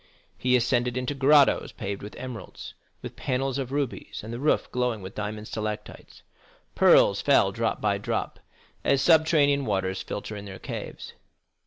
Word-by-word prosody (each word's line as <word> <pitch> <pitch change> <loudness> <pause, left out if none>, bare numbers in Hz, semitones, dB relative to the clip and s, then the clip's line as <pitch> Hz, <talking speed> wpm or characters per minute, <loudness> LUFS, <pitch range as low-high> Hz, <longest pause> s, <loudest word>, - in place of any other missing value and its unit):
He 125 0 +2
ascended 125 0 +1
into 125 +2 -2
grottos 140 +1 +4
paved 100 0 -5
with 105 - -9
emeralds, 125 -6 -8 0.3
with - - -7
panels 135 0 -2
of 130 -1 -4
rubies, 140 -3 -3
and 110 +2 -7
the 120 - -5
roof 150 +3 +1
glowing 125 -5 -1
with 95 +2 -8
diamond 105 0 -5
stalactites. 110 -1 -6 0.5
Pearls - - +5
fell - - +4
drop - - -1
by - - +1
drop, - - -3 0.4
as 140 - +3
subterranean 150 -3 +4
waters 95 -4 -1
filter 105 +1 -6
in 100 0 -8
their 95 -1 -8
caves. - - -7
125 Hz, 155 wpm, -26 LUFS, 105-135 Hz, 0.5 s, Pearls